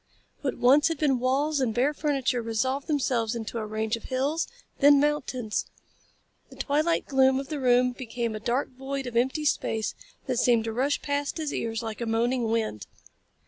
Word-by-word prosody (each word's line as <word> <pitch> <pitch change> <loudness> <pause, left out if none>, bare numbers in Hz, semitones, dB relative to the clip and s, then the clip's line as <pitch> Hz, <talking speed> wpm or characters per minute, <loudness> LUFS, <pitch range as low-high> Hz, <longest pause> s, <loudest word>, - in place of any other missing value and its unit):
What 275 - -2
once 275 +5 +5
had 330 -2 -2
been 275 -4 +2
walls 275 +4 +1
and 240 -5 0
bare 265 +5 +2
furniture 275 -5 0
resolved 260 +5 -1
themselves 250 -6 0
into 230 0 -4
a 215 - -4
range 215 +1 -1
of 230 - -10
hills, 275 +5 -1 0.3
then 285 0 +7
mountains. 275 -6 -1 0.8
The - - -14
twilight 310 +4 +1
gloom 265 -1 +3
of 275 - -7
the 300 - -3
room 250 -1 +4
became 240 -2 -4
a - - -4
dark 240 +5 -1
void 270 +1 -5
of 245 -1 -6
empty 265 +6 +1
space 225 -6 0 0.3
that 255 -3 -1
seemed 235 -3 +3
to 225 0 -3
rush 270 +5 0
past 285 +1 -2
his 310 -2 -3
ears 225 0 -2
like 220 +1 -5
a 235 - -2
moaning 235 +2 +1
wind. 220 - -1
255 Hz, 185 wpm, -27 LUFS, 230-285 Hz, 0.8 s, then